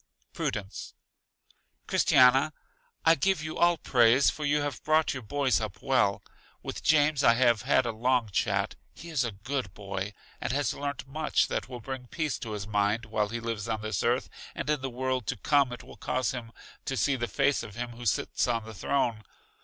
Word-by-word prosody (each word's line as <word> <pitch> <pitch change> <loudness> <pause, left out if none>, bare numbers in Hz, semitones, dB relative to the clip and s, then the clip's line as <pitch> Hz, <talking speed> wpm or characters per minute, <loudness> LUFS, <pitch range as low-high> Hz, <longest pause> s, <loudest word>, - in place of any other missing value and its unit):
Prudence: 100 -1 -4 0.9
Christiana, 130 +4 +5 0.5
I 165 - +7
give 165 +2 +1
you 155 - -5
all 175 0 +4
praise, 125 -1 +4
for 150 - -5
you 145 +1 +2
have 145 -1 -3
brought 155 +1 +2
your 130 - -5
boys 135 +1 +1
up 105 -4 -5
well. 125 -7 +1 0.4
With - - -5
James 150 -2 +3
I 115 - +6
have 120 -3 +3
had 130 0 +3
a 115 - 0
long 120 0 +1
chat; 95 - 0 0.2
he 165 0 -10
is 145 -5 +1
a 115 - -2
good 110 0 -4
boy, 100 0 -5 0.3
and - - -1
has 145 +1 0
learnt 140 -2 -4
much 155 +3 0
that - - -3
will 125 -2 -7
bring 130 0 -6
peace 155 +1 -2
to 110 -2 -5
his 100 -2 -4
mind, 105 +2 0
while 105 -1 -1
he 120 +2 -3
lives 115 -1 -4
on 110 -1 -2
this 110 -3 -1
earth, 120 +2 +1 0.3
and - - -4
in 150 -3 0
the 135 - -3
world 130 -2 -2
to 125 - -2
come 140 +3 +3
it 125 - -7
will - - -13
cause 130 -3 -1
him 120 -3 -6 0.3
to 135 - -2
see 140 +1 +2
the 120 -2 -2
face 140 +2 +1
of 105 - -9
Him 120 0 -4
who 120 0 -6
sits 95 - 0
on 115 -2 -1
the 110 - -9
throne. 115 +2 0
125 Hz, 200 wpm, -28 LUFS, 110-140 Hz, 0.9 s, I